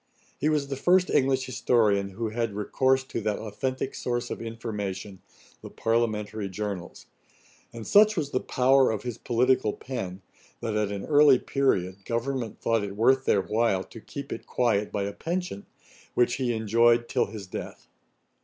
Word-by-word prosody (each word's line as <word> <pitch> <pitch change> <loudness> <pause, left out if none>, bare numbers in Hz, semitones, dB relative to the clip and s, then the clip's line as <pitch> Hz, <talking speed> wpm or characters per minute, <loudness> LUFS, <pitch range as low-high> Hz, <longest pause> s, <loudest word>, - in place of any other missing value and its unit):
He 150 - +2
was 145 -2 0
the 135 - -2
first 180 +6 +3
English 130 -1 +2
historian 110 -6 +2
who 110 +4 -4
had 115 -2 -2
recourse 130 +5 +1
to 130 -3 -5
that 105 -1 -1
authentick 130 +5 -3
source 120 -1 -3
of - - -5
information, 105 -4 -5 0.4
the - - -9
Parliamentary 110 -3 -1
Journals; 95 -2 -5 0.7
and 115 -2 -8
such 215 0 +5
was 145 -3 -1
the 130 - +1
power 130 +1 +3
of 110 -2 -2
his 120 -2 -5
political 125 -2 +2
pen, 95 -8 -6 0.4
that, 110 -2 -3
at 105 -1 0
an 100 -1 -4
early 145 -3 +6
period, 100 -10 0
Government 120 0 -3
thought 115 -2 +1
it 100 -1 -5
worth 130 +5 +3
their 100 - +3
while 105 -3 +1
to 115 - -12
keep 140 +4 -7
it - - -9
quiet 110 -5 +1
by 100 - -1
a 100 0 -3
pension, 170 - -4 0.5
which 120 0 +2
he 130 -3 0
enjoyed 115 +1 +3
till - - +1
his 105 -1 -8
death. 90 - -8
115 Hz, 165 wpm, -27 LUFS, 105-130 Hz, 0.7 s, early